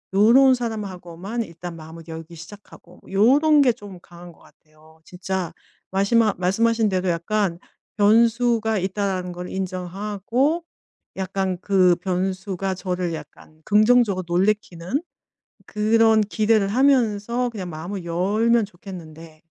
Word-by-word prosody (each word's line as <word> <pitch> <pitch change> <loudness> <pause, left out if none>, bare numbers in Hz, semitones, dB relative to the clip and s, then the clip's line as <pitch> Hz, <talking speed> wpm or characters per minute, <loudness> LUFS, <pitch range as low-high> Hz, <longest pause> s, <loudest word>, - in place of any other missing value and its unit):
요런 255 +6 +6
사람하고만 205 -2 -5
일단 170 -1 -9
마음을 160 +1 -11
열기 165 +1 -9
시작하고 180 0 -14
요런 285 +10 +4
게 255 -3 +5
좀 205 -5 -11
강한 175 0 -13
것 - - -22
같아요. 155 +1 -23
진짜 180 -2 -4 0.4
마시마 210 +3 +2
말씀하신 220 +4 +2
대로 185 -1 -1
약간 175 +1 -1 0.4
변수가 225 0 +3
있다라는 190 -1 -2
걸 180 +1 -7
인정하고 200 - -2 0.5
약간 190 -1 -2
그 185 -3 +4
변수가 190 +1 -2
저를 180 -2 -3
약간 155 +1 -11
긍정적으로 215 -2 +3
놀래키는 185 - -1 0.6
그런 220 +1 +3
기대를 215 0 +1
하면서 240 -1 +2
그냥 190 -6 -6
마음을 175 +4 -6
열면 210 +7 +1
좋겠는데. 165 -4 -12
195 Hz, 280 characters per minute, -22 LUFS, 175-220 Hz, 0.6 s, 요런